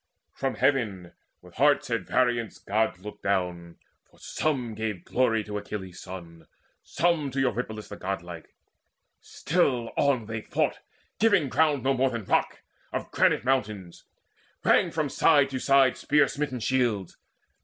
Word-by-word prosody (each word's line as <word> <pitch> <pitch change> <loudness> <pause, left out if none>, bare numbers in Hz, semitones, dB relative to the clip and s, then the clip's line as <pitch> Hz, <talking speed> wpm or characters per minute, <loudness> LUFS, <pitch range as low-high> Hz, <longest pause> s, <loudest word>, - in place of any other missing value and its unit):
From 135 -1 -2
Heaven, 105 -11 0 0.3
with 90 -1 -15
hearts 140 -2 +3
at 115 - -1
variance, 120 -4 +1
Gods 105 -3 -1
looked 105 - -8
down; 90 -3 -2 0.3
For - - -25
some 130 -7 -2
gave 105 -5 -4
glory 115 -4 +1
to 105 0 -4
Achilles' 95 -3 -7
son, 85 -3 -10 0.3
Some 165 -4 0
to 135 +1 -3
Eurypylus 120 -4 -2
the 105 - -8
godlike. 85 -3 -6 0.6
Still 135 -8 0 0.3
They 110 +1 -5
fought - - -1
on, - - -24 0.4
giving 200 -10 +3
ground 150 -3 +2
no 135 +1 +2
more 135 +1 +2
than 115 -4 -5
rock. - - 0 0.3
Of - - -4
granite - - +2
mountains. 105 -9 -2 0.6
Rang - - +4
from - - -1
side 145 -4 +3
to 130 - -2
side 135 -1 +4
Spear 150 +1 +3
smitten 140 -4 -3
shields. 115 -7 0
115 Hz, 145 wpm, -27 LUFS, 100-135 Hz, 0.6 s, Rang